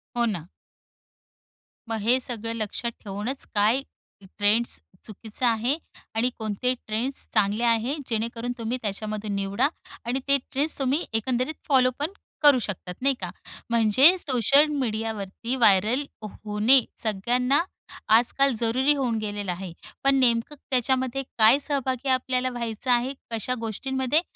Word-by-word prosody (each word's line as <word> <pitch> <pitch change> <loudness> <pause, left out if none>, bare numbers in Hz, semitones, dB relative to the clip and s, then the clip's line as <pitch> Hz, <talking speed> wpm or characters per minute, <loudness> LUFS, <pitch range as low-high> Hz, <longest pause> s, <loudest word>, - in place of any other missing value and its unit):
हो, 240 0 +2
ना. 180 -7 -3 1.4
मग 225 - -1
हे 240 +5 +3
सगळं 230 -3 -2
लक्षात 225 +2 -3
ठेवूनच, 210 +6 -4
काय 215 +6 +3 0.4
ट्रेंड्स 205 +4 +1 0.3
चुकीचा 220 +3 -3
आहे 235 +6 +1 0.4
आणि 235 +3 +2
कोणते 220 +3 -1
ट्रेंड्स 235 +6 -2
चांगले 205 +3 +1
आहे, 235 +3 +2
जेणेकरून 230 +1 -2
तुम्ही 230 +2 -2
त्याच्यामधून 210 0 -3
निवडा 200 +5 +1 0.4
आणि 245 +3 -1
ते 280 0 +4
ट्रेंड्स 290 +4 0
तुम्ही 275 +4 0
एकंदरीत 250 +5 0
फॉलोपण 265 +3 +2 0.3
करू 290 -3 +7
शकतात, 190 -4 -5
नाही 275 +1 +2
का? 180 - -3 0.4
म्हणजे 235 - +6
सोशल 275 - +4
मीडियावरती 225 -1 -3
व्हायरल 225 +3 +3 0.2
होणे 215 +5 +3 0.2
सगळ्यांना 245 +7 +1 0.5
आजकाल 270 +4 +3
जरुरी 255 +5 +2
होऊन 250 -5 0
गेलेलं 205 -3 -3
आहे, 180 0 -6 0.3
पण 275 0 +5
नेमकं 240 +2 +2
त्याच्यामध्ये 260 +1 0
काय 225 +4 +6
सहभागी 270 -2 -1
आपल्याला 255 0 +1
व्हायचं 240 0 -3
आहे, 245 +2 +2 0.2
कशा 230 +2 -1
गोष्टींमध्ये 265 +6 0
235 Hz, 125 wpm, -25 LUFS, 215-260 Hz, 1.4 s, करू